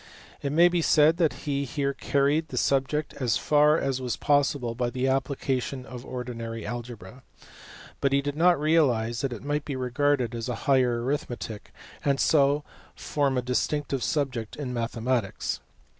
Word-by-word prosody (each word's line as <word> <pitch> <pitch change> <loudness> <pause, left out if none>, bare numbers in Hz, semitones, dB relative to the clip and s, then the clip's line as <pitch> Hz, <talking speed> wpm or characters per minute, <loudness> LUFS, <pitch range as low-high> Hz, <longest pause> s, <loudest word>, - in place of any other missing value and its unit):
It 140 - -2
may 170 +4 +6
be 175 -1 +1
said 155 +1 +4
that 165 -5 +3
he 140 -1 0
here 140 +1 -2
carried 145 +4 +1
the - - -7
subject 140 +3 0
as 125 -4 +1
far 150 +1 +4
as 135 -4 -1
was 125 -2 -2
possible 145 -4 +1
by 120 +1 -1
the 130 +2 -1
application 130 -1 -1
of 125 -2 -9
ordinary 115 -3 -6
algebra; 120 0 -7 0.8
but 140 - +1
he 140 - +3
did 145 +1 -3
not 175 0 +4
realize 125 -8 +2
that 135 - -1
it 120 -1 -7
might 145 0 -1
be 140 - -4
regarded 130 0 0
as 115 +1 -4
a 125 - -1
higher 125 -4 +3
arithmetic, 120 -5 -4 0.3
and 140 -1 +1
so 145 -1 +3 0.3
form 140 -3 0
a 125 - 0
distinct 140 +4 -1
subject 130 -8 -2
in 135 -4 -5
mathematics. 115 -2 -2
135 Hz, 160 wpm, -26 LUFS, 120-145 Hz, 0.8 s, may